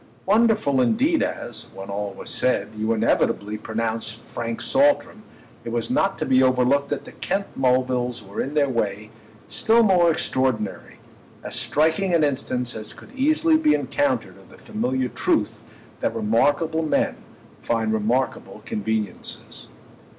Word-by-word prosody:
Wonderful 210 - +3
indeed 270 - +2
as, 120 - -4
when 95 +1 -7
all 100 0 -3
was - - -5
said, 105 -5 +1
you 110 +1 -1
inevitably 105 -1 +1
pronounced 110 0 -3
Frank 115 0 -5
Saltram, 275 -5 +2 0.4
it - - -5
was 115 -1 -2
not 195 0 +1
to - - -2
be 130 0 +4
overlooked 130 +2 +3
that 145 - -3
the - - -10
Kent 195 +1 -2
Mulvilles 125 -2 +1
were 100 0 -5
in 140 +3 -4
their 145 -2 +3
way 110 -4 -2 0.4
still 230 +1 +3
more 180 -5 +4
extraordinary: 130 -9 -1 0.5
as - - -5
striking 160 +4 +1
an 160 - +3
instance 130 -3 -1
as 110 -1 -7
could 230 - -15
easily 310 +4 +3
be 310 -1 +3
encountered 285 -1 -1
of - - -19
the - - -16
familiar 130 - -2
truth - - -1 0.4
that - - -1
remarkable 145 +9 +1
men 155 - 0 0.4
find 115 -2 0
remarkable 115 +5 -1
conveniences. 110 0 -4
130 Hz, 145 wpm, -23 LUFS, 110-180 Hz, 0.5 s, be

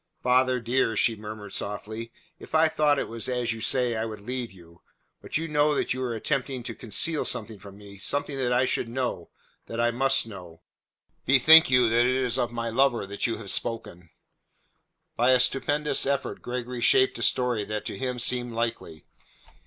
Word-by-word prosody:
"Father, 125 0 +3
dear," 115 -1 0
she 115 - +2
murmured 105 -1 -9
softly, 110 +3 -5 0.3
"if - - -7
I 160 +1 +5
thought 150 -2 +2
it - - -2
was 115 +1 -2
as 125 -2 -1
you 110 - -9
say, 125 0 +1
I 110 - -2
would 110 -2 -7
leave 125 +2 -5
you. 85 -2 -18 0.4
But - - -2
you 165 +1 -3
know 150 -1 +2
that - - 0
you 130 - -5
are 125 -2 -2
but - - -3
attempting 130 +1 -2
to 115 - -5
conceal 135 +9 0
something 110 -3 -2
from 100 +1 -13
me 100 -1 -13
something 145 +5 -1
that 125 -2 0
I 125 +1 +3
should 120 - -1
know, 120 -8 -3 0.4
that 115 - -6
I 120 0 +2
must 135 +2 +2
know. 90 -6 -12 0.6
Bethink 145 +5 +7
you 125 -2 +4
that 120 +1 +3
it 130 - +1
is 130 -1 0
of 120 -1 -1
my 115 -1 -3
lover 120 -3 +2
that 100 +3 -3
you 115 - -3
have 105 -3 -4
spoken." 90 -7 -3 1.1
By 125 +2 +3
a 130 - +4
stupendous 145 +3 +1
effort 140 0 -2
Gregory 125 0 -5
shaped 130 +2 +3
a - - -7
story 125 -4 +1
that 105 +1 -5
to - - -4
him 125 -1 -3
seemed 120 0 -1
likely. 115 -8 -4
120 Hz, 195 wpm, -26 LUFS, 110-130 Hz, 1.1 s, Bethink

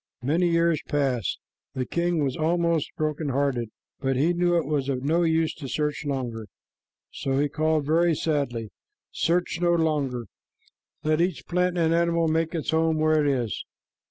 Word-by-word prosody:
Many 165 +7 +2
years 170 -1 +2
passed. 135 - 0 0.4
The 130 -1 -1
king 170 +1 0
was 135 -2 -1
almost 170 -1 +1
broken 155 -1 -1
hearted, 130 -4 0 0.3
but 135 -1 0
he 155 +7 +2
knew 175 0 +2
it 165 - 0
was 140 -2 -1
of 130 -1 -2
no 160 +5 +2
use 160 -1 +2
to 140 - -8
search 150 +1 -2
longer, 120 -6 -3 0.6
so 135 -1 -2
he 145 +1 +2
called 155 0 0
very 165 +2 +3
sadly, 135 -9 -1 0.4
"Search 170 -1 0
no 175 0 +3
longer. 145 -7 0 0.8
Let 155 +1 +2
each 175 -2 -1
plant 180 0 0
and 165 -1 +2
animal 170 0 +2
make 165 +1 0
its 160 - -2
home 160 0 +2
where 155 -1 +3
it - - +1
is. 120 -7 -2
155 Hz, 165 wpm, -25 LUFS, 140-170 Hz, 0.8 s, very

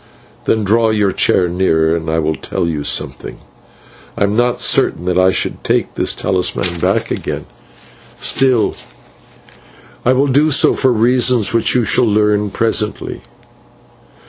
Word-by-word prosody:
Then 110 -1 +1
draw 110 +3 +2
your 105 -3 +1
chair 90 0 +2
nearer 85 -2 +1
and 80 -1 -4
I 80 - 0
will 80 -1 0
tell 80 - -4
you 80 -3 -3
something. - - -2 0.8
I - - +1
am 100 +1 0
not 120 +1 +1
certain 85 - +1
that 90 0 +1
I 95 0 +4
should - - -3
take - - -1
this - - 0
talisman 90 -1 -1
back - - -1
again, - - -4 0.7
still 130 -4 +2 1.3
I 130 - +3
will 135 +2 +2
do 145 +3 +2
so 145 - +3
for 130 - +1
reasons 120 0 +2
which 115 +1 +1
you 120 -2 +2
shall 125 - +2
learn 105 -1 +1
presently. 110 0 -2
105 Hz, 145 wpm, -15 LUFS, 90-120 Hz, 1.3 s, I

